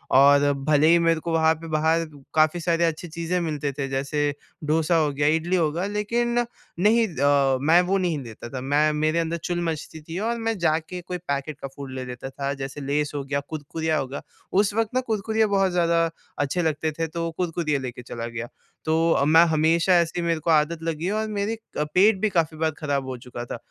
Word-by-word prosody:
और 145 +1 +6
भले 145 +2 +2
ही 170 - +6
मेरे 165 -1 +2
को 170 +1 -4
वहाँ 160 0 +4
पे 165 +1 -10
बाहर 160 +2 +2 0.3
काफ़ी 155 +2 +3
सारे 170 0 +1
अच्छी 165 +2 -2
चीज़ें 170 +2 -2
मिलते 150 -3 -2
थे। 135 -1 -2
जैसे 140 +2 -1 0.4
डोसा 160 +2 +2
हो 155 -2 +2
गया 145 +1 +1
इडली 175 +3 0
हो 165 -4 +2
गया 175 +5 -2
लेकिन 235 +4 -1 0.4
नहीं 220 +4 +4
अ, 140 -4 +2
मैं 165 +5 +5
वो 190 +2 +1
नहीं 175 -6 0
लेता 115 0 -9
था। 130 0 -5
मैं 145 +3 +2
मेरे 155 +2 +1
अंदर 165 +1 -1
चुल 175 -1 -1
मचती 160 -1 -4
थी 165 +4 -6
और 230 +2 -1
मैं 225 -1 -1
जा 160 -2 +3
के 175 +3 -8
कोई 180 +1 -5
पैकेट 140 -3 -4
का 135 - -4
फूड 140 -2 -8
ले 130 -1 -5
लेता 125 +1 -7
था। 140 +1 -3
जैसे 135 +2 -6
लेज़ 145 +1 -1
हो 140 - -2
गया 140 +1 -1
कुरकुरिया 155 +1 -2
हो 135 - -2
गया। 135 +2 -6 0.3
उस 200 +1 +2
वक़्त 225 0 0
ना 255 - +2
कुरकुरिया 220 0 +1
बहुत 195 -2 +2
ज़्यादा 170 -1 +2 0.3
अच्छे 145 +5 0
लगते 155 -1 0
थे 165 - 0
तो 165 +1 -3
कुरकुरिया 165 -5 -1
लेके 125 -2 -6
चला 115 -1 -6
गया। 120 0 -5 0.4
तो 160 -2 +2
मैं 160 +3 +7
हमेशा 165 +4 +3
ऐसे 170 +1 -1
ही 170 - -2
मेरे 165 -1 +1
को 160 - -3
आदत 155 +2 +2
लगी 165 0 -3
है 200 - 0
और 220 0 -1
मेरी 205 +1 -2 0.2
अ, 150 - +1
पेट 190 +6 +3
भी 215 - +2
काफ़ी 165 -4 0
बार 160 0 +1
ख़राब 140 -3 -1
हो 130 -1 -4
चुका 120 0 -8
था। - - -6
160 Hz, 225 wpm, -24 LUFS, 145-175 Hz, 0.4 s, मैं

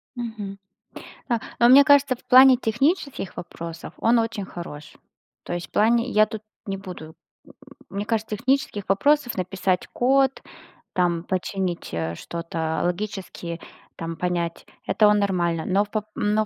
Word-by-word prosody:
Мгм. 220 -5 -6 0.7
А, 235 -1 +2 0.2
но 235 - +6
мне 275 +3 +9
кажется, 285 -2 +5
в - - -23
плане 255 0 +8
технических 265 - -1
вопросов 170 -1 -8
он 230 +1 +3
очень 225 -3 -2
хорош. 155 -5 -9 0.5
То - - -5
есть 175 0 -4
в - - -41
плане 230 +3 +3
я 215 0 +5
тут 215 -1 -7 0.2
не 195 -1 -3
буду 175 -5 -9 0.3
м - - -17 0.4
мне 200 +1 -4
кажется, 220 -1 -1
технических 260 -5 -1
вопросов: 255 +4 +2
написать 185 0 -1
код, 270 +1 +2 0.5
там, 175 -2 +1
починить, 185 -1 -3
э, 85 0 -2
что-то 165 - -3
логически, 180 -2 -4 0.4
там, 165 0 -5
понять 170 -1 -2 0.2
это 215 - +4
он 210 0 +4
нормально. 175 -5 0
Но, 195 +2 +2
в - - -23
по 215 -2 -1
но 210 +1 +1
200 Hz, 150 wpm, -24 LUFS, 175-235 Hz, 0.7 s, мне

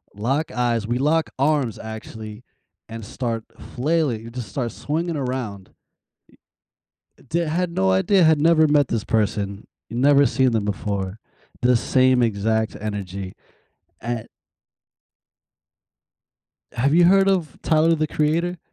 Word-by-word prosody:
lock 135 +10 -1
eyes, 120 -3 0
we 120 +1 0
lock 155 +4 +1
arms, 140 -5 +1
actually, 110 0 -8 0.5
and 115 -1 -7
start 115 0 -4 0.3
flailing, 140 -4 0
we 115 - -9
just 120 -3 -7
start 120 +1 -3
swinging 165 +7 -3
around. 125 -8 -4 1.5
Eh - - -20
d 170 - 0
had 170 +2 -1
no 95 - +1
idea, 180 - +3
had 160 -2 +4
never 160 -1 +5
met 145 -2 +3
this 115 -2 -2
person, 105 -3 -1 0.2
never 140 +4 +4
seen 130 +1 +2
them 110 -3 0
before. 100 -1 -3 0.4
The 125 0 +4
same 130 +2 +3
exact 110 0 0
energy, 100 -3 -5 0.7
at 120 -1 -4 2.4
Have 140 +5 +1
you 175 +1 +6
heard 195 +2 +5
of 175 -8 0
Tyler, 160 +1 +3
The 155 -1 0
Creator? 165 +4 0
125 Hz, 130 wpm, -22 LUFS, 110-155 Hz, 2.4 s, you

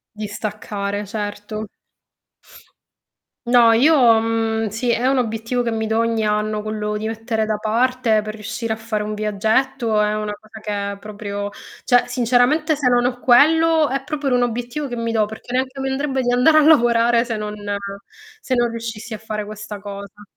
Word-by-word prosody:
Di 215 0 -4
staccare 205 -1 -4
certo. 205 +1 -5 1.8
No, 240 -1 +6
io 275 +8 +5 0.3
mhmm, 225 -1 0
sì, 230 +4 -1
è 235 +2 0
un 270 +1 +3
obiettivo 230 0 -1
che 235 - -1
mi 220 -1 -2
do 220 +1 0
ogni 230 -1 0
anno 210 0 0
quello 210 0 -3
di 215 - -4
mettere 225 0 -2
da 215 - 0
parte 230 +1 +1
per 215 0 -6
riuscire 220 +1 -4
a - - -10
fare 220 -1 -3
un 210 0 -4
viaggetto 220 +3 0
è 210 0 +1
una 210 -1 -3
cosa 215 +1 -14
che 205 -1 -3
è 200 - -9
proprio 205 -1 -5 0.4
cioè 245 -1 +4
sinceramente 255 +6 +2
se 275 -3 +1
non 245 0 +3
ho 250 0 -2
quello 315 +5 +4
è 270 +1 -2
proprio 290 -2 -2
un 245 - +2
obiettivo 245 +4 -2
che 245 - -5
mi 230 0 -2
do 220 -2 +2
perché 220 +3 -9
neanche 260 +1 -1
mi 270 - -2
andrebbe 270 0 -1
di 245 -1 0
andare 255 +6 +5
a - - +7
lavorare 235 -5 +4
se 230 -3 -3
non 210 0 -4 0.9
se 260 - -1
non 240 -1 +2
riuscissi 230 -1 -6
a - - -6
fare 215 -1 -5
questa 215 0 -8
cosa. 200 0 -9
225 Hz, 185 wpm, -20 LUFS, 215-245 Hz, 1.8 s, a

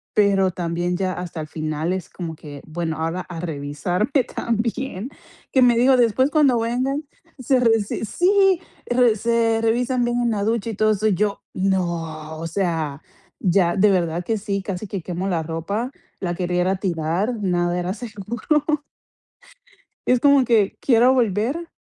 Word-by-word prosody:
pero 195 -2 +3
también 175 0 -2
ya 185 -1 -1
hasta 175 -3 -6
el 155 - -6
final 155 +2 -2
es 185 -3 -5
como 165 -3 -6
que: 145 -2 -10
"Bueno, 160 0 -3
ahora 165 +3 -2
a 175 -2 -8
revisarme 175 - -1
también". 235 0 -2 0.4
Que 265 - +3
me 240 -1 +5
dijo: 255 +2 +5
"Después 245 +3 +3
cuando 275 -7 +4
vengan, 255 +6 -1 0.4
se 255 +1 +2
re 230 -2 +4
s 210 +1 -3
sí, 380 - +3 0.3
re 245 -3 +3
se 230 0 +1
revisan 245 +2 +1
bien 240 0 0
en 235 -1 +1
la 200 -2 -1
ducha 225 0 0
y - - -6
todo 215 +1 +3
eso". 215 +1 +1
Y 210 - +3
yo: 205 +1 -1
"No 170 -5 -2
o 165 - -4
sea, 165 -5 -2 0.4
ya", 175 -2 +2
de 205 +1 +5
verdad 175 -2 0
que 225 +1 0
sí, 200 -1 -2
casi 195 +1 -4
que 190 -2 -4
quemo 180 +2 -3
la 170 -3 0
ropa, 200 +10 -3 0.3
la 175 -2 -2
quería 180 0 0
ir 180 - +1
a 190 - +2
tirar, 180 +5 -1
nada 175 -2 0
era 180 +2 -2
seguro. 230 +6 -2 1.4
Es 250 -1 +3
como 280 -2 +5
que 220 -4 +2
quiero 245 0 +4
volver, 245 - 0
200 Hz, 170 wpm, -22 LUFS, 175-235 Hz, 1.4 s, me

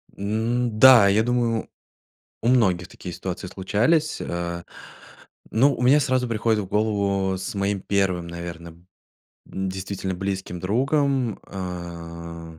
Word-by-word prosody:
М, 110 +3 -1
да, 125 -5 +9
я 105 +3 +3
думаю 120 -2 0 0.7
у 115 - -1
многих 95 -9 +3
такие 90 - -9
ситуации 95 +1 -5
случались, 115 - +1
э. 85 0 -4 0.9
Ну, 135 +6 +4
у - - -6
меня 130 +4 +5
сразу 130 -3 +1
приходит 110 -1 +1
в - - -5
голову 100 -2 0
с 95 +2 -5
моим 100 0 -1
1, 95 -4 0
наверное, 85 -1 -7 0.7
действительно, 95 0 -4
близким 95 -1 -4
другом, 130 - +1
э. 85 -3 -7
100 Hz, 120 wpm, -24 LUFS, 90-115 Hz, 0.9 s, да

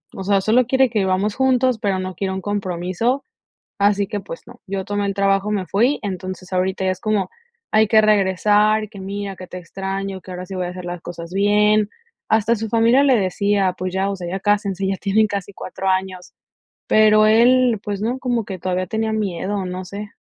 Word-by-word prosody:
o 195 - -5
sea, 195 0 +2
solo 230 +4 +3
quiere 265 -1 +3
que 220 - 0
vivamos 190 +2 +1
juntos, 255 -2 +2
pero 200 -2 0
no 185 0 -4
quiere 190 +2 -3
un 190 - -4
compromiso, 200 +5 -2 0.6
así 200 0 +2
que, 205 - -3
pues, 190 -4 -9
no. 240 0 -15
Yo 195 0 -3
tomé 205 0 -2
el 200 - -1
trabajo, 195 +1 +1
me 195 -3 -1
fui. 240 +10 +1
Entonces, 185 -2 -6
ahorita 185 +1 -1
ya 185 - +2
es 185 - -5
como: 210 -4 0 0.4
"Hay 215 0 +4
que 220 0 +5
regresar, 210 +1 +3
que 200 -3 -11
mira, 200 0 -5
que 185 0 -10
te 180 - -8
extraño, 195 +2 -5
que 185 - -11
ahora 180 0 -6
sí 190 +1 -8
voy 180 -1 -2
a - - -4
hacer 180 0 -8
las 175 -1 -5
cosas 170 0 -8
bien". 210 +1 +3 0.4
Hasta 220 +1 +3
su 220 +1 -4
familia 230 +5 +4
le 270 -3 +4
decía: 200 -1 +1
"Pues 185 0 -4
ya, 190 +1 0
o 200 - -2
sea, 175 -1 -6
ya 190 +2 -3
cásense, 200 -2 0
ya 195 0 -1
tienen 215 +2 +2
casi 200 -1 -5
4 190 +1 -6
años". 185 -1 -2 0.5
Pero 215 0 +5
él, 240 +1 +4
pues, 205 -1 -4
no, 240 +4 -1
como 240 -4 -1
que 190 -3 -6
todavía 185 0 -2
tenía 220 +1 -1
miedo, 205 -1 -2
o 190 - -3
no 180 +1 -5
sé. 205 +3 -7
200 Hz, 215 wpm, -20 LUFS, 185-215 Hz, 0.6 s, que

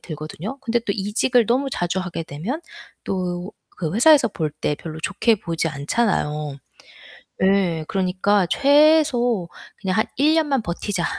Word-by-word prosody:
들거든요. 160 - -7
근데 240 -2 0
또 205 -3 -2
이직을 215 +4 +1
너무 260 +4 +1
자주 175 -1 -2
하게 175 -3 -4
되면 185 - -5 0.4
또 180 0 -3 0.2
그 165 -3 -3
회사에서 260 +2 +5
볼 155 -6 -3
때 150 -1 -2
별로 160 0 -8
좋게 230 +7 +1
보지 165 -1 -2
않잖아요. 150 -2 -1 0.8
예. 190 -4 +2
그러니까 190 +1 +1
최소 275 - +3 0.3
'그냥 190 +2 -1
한 220 - +2
1 295 +4 +3
년만 290 -6 +1
버티자.' 175 0 -3
195 Hz, 275 characters per minute, -22 LUFS, 170-240 Hz, 0.8 s, 회사에서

